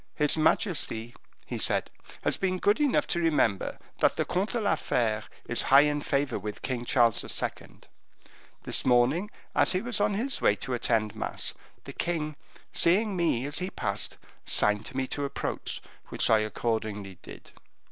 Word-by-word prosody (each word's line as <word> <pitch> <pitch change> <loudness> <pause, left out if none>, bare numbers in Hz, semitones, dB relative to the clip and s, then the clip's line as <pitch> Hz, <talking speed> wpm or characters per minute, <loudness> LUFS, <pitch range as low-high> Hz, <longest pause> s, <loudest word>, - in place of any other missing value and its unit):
"His 150 -1 +3
majesty," 155 - +1 0.3
he - - -5
said, - - +1 0.3
"has - - +2
been 185 -1 -1
good 205 +6 +2
enough 290 -3 +2
to 175 - -1
remember 145 - +1 0.2
that - - +3
the - - 0
Comte 190 +6 -1
de 240 - 0
la 205 -2 +2
Fere 110 -3 0 0.3
is 120 - +3
high 140 +1 +8
in 145 0 +1
favor 140 -1 -1
with 105 -1 -7
King 125 -2 -3
Charles 120 -2 +3
II. - - -3 0.8
This - - +1
morning, 130 +11 +3 0.2
as - - +3
he 185 - 0
was 235 -4 +1
on 205 -1 +2
his 260 +6 -1
way 105 - +4
to 130 +4 -5
attend 115 -3 0
mass, - - -2 0.3
the - - -9
king, 155 -3 -2 0.4
seeing 200 +4 +3
me 165 -8 +1
as 145 - -1
he 185 +1 -3
passed, 100 - -2 0.3
signed 105 +1 +2
to 130 - -8
me 130 - 0
to 145 +2 -4
approach, 140 0 -4 0.3
which - - +1
I 110 - +6
accordingly 110 -3 -3
did. - - -11
140 Hz, 170 wpm, -28 LUFS, 115-185 Hz, 0.8 s, high